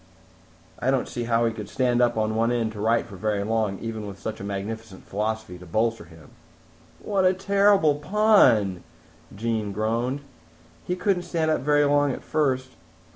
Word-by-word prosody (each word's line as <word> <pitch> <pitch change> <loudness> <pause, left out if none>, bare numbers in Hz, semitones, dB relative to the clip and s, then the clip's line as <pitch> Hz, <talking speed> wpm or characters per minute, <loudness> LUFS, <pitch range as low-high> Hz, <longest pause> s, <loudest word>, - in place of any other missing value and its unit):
_'" - - -28 0.8
"I 125 - 0
don't 135 -1 +1
see 120 -1 -4
how 115 0 +2
he 115 - 0
could 105 -2 -7
stand 125 -2 +1
up 120 -1 +2
on 110 +2 +1
end 115 -2 0
to 105 -2 -7
write 115 +2 +2
for 100 -5 -11
very 105 +1 -1
long, 110 -2 0
even 110 -1 -5
with 100 -1 -8
such 110 0 -5
a - - -7
magnificent 100 +1 -6
philosophy 105 -3 -3
to 90 - -12
bolster 110 +3 0
him." 80 -2 -16 0.7
"What 200 -2 0
a 185 0 +4
terrible 195 -4 +3
pun," 145 - +3 0.5
Jean 110 -1 -2
groaned. 115 +6 -1 0.7
"He 180 - 0
couldn't 180 0 0
stand 165 -3 -1
up - - 0
very 145 +1 +3
long 145 0 +3
at - - -6
first. 130 -4 0
115 Hz, 180 wpm, -25 LUFS, 110-145 Hz, 0.8 s, a